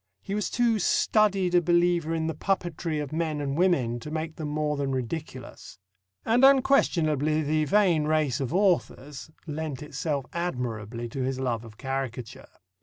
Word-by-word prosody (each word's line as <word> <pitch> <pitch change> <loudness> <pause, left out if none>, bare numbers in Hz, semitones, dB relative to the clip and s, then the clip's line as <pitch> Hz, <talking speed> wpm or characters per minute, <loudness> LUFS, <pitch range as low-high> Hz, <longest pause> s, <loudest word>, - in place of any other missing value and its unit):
He 195 - -5
was 210 0 -1
too 235 -2 +1
studied 195 -2 +2
a 175 - +5
believer 175 -1 +2
in 160 -1 -1
the 160 - -1
puppetry 170 -2 -2
of 150 -1 -5
men 160 -2 -1
and 140 -1 -2
women 140 -10 +1
to 135 - -8
make 160 +1 -4
them 155 - -5
more 150 0 -1
than 140 -1 -2
ridiculous. 130 - -6 0.5
And 240 +3 +3
unquestionably 155 - +3
the 155 +1 +1
vain 180 -4 +3
race 155 -5 +1
of 135 -2 -3
authors 165 -7 0 0.2
lent 150 -3 -5
itself 150 -2 -3
admirably 120 -9 -3
to 135 +3 -5
his 130 0 -2
love 120 -3 -2
of 110 -2 -13
caricature. 130 -3 -5
155 Hz, 160 wpm, -27 LUFS, 135-175 Hz, 0.5 s, a